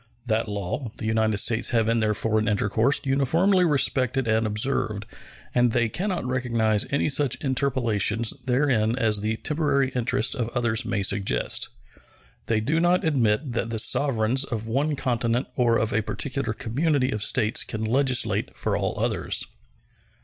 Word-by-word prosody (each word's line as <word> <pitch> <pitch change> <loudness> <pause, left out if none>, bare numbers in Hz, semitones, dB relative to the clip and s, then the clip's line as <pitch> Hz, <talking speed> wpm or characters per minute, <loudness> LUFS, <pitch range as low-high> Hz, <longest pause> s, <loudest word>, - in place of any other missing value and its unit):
That 115 -1 0
law 105 +4 -4
the 110 - -5
United 110 -1 +1
States 110 +3 +2
have 115 -3 +1
in 115 0 +1
their 105 -1 0
foreign 110 0 0
intercourse 110 +5 +1
uniformly 165 +8 +2
respected 135 -5 +1
and 110 0 +1
observed, 105 -1 -1 0.5
and 120 -2 +2
they 120 -2 +1
can 190 - -3
not 180 -8 -3
recognize 115 -4 0
any 140 - 0
such 140 -3 +2
interpolations 120 -5 0 0.2
therein 125 -3 +1
as 110 -4 +1
the 110 +1 -1
temporary 145 -3 0
interests 125 -1 0
of 120 -2 -3
others 115 -2 0
may 100 - -2
suggest. 95 - 0 0.8
They 110 -2 +1
do 145 +9 0
not 175 +2 +2
admit 130 -3 +1
that 115 0 -2
the 115 - -3
sovereigns 125 +1 +2
of 115 -5 -4
one 140 +6 -1
continent 125 -2 -1
or 120 -2 +2
of 110 0 -1
a 110 - +1
particular 135 +1 -3
community 135 +4 -1
of 105 - -3
states 110 0 +2
can 110 -1 -4
legislate 130 +2 +1
for - - -1
all - - -2
others. - - 0
120 Hz, 155 wpm, -24 LUFS, 110-135 Hz, 0.8 s, States